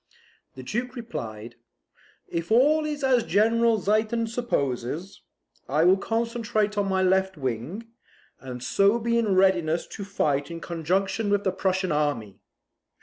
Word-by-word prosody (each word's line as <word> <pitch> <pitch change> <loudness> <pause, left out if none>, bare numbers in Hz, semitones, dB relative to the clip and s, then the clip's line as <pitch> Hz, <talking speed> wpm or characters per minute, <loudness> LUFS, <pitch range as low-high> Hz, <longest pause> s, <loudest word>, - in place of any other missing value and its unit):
The 130 - -9
Duke 245 - -3
replied 120 - -7 0.7
"If 170 0 -4
all 295 +7 +4
is 295 -2 -4
as 260 -2 +4
General 230 +2 +3
Ziethen 215 +3 0
supposes, 170 - -3 0.5
I 150 +4 +2
will 180 +2 +6
concentrate 225 -1 -1
on 200 -1 0
my 190 0 +1
left 190 0 +2
wing, 130 - -4 0.5
and 125 -1 -8
so 200 - +3
be 235 0 +1
in 210 -4 +1
readiness 175 -4 +2
to 200 - -8
fight 145 -8 -1
in 170 0 -6
conjunction 190 +6 -1
with 205 0 +1
the 190 - +1
Prussian 190 0 -1
army. 145 -9 -1
195 Hz, 140 wpm, -25 LUFS, 155-230 Hz, 0.7 s, will